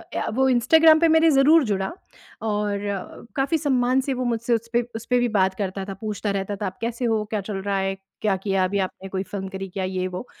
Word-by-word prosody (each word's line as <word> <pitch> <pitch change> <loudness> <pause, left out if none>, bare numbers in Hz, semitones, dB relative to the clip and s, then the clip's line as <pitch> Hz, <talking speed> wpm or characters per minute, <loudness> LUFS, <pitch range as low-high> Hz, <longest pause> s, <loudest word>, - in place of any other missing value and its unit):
या - - -1
वो 265 0 +3
इंस्टाग्राम 315 +6 +6
पे 335 - +4
मेरे 320 +1 +5
ज़रूर 290 +3 +5
जुड़ा 195 -3 -1 0.5
और 210 -2 -1 0.6
काफ़ी 275 +5 +2
सम्मान 260 -3 +2
से 270 0 -2
वो 255 - -2
मुझसे 235 0 0
उसपे 230 +1 0
उसपे 245 +2 0
भी 245 - +2
बात 190 -1 +3
करता 195 -1 -3
था, 195 - -5
पूछता 210 +1 -3
रहता 200 +1 -2
था 205 - -3
आप 185 - -7
कैसे 235 +2 -2
हो, 220 -2 +1
क्या 210 -2 -1
चल 195 0 -5
रहा 200 0 -1
है? 195 0 -1 0.3
क्या 205 -3 +2
किया 195 -1 0
अभी 200 +2 -1
आपने 190 0 -4
कोई 190 0 -2
फ़िल्म 195 -1 -6
करी 195 0 -6
क्या 190 +1 -4
ये 185 0 -2
वो, 180 +5 -6
210 Hz, 225 wpm, -23 LUFS, 195-250 Hz, 0.6 s, इंस्टाग्राम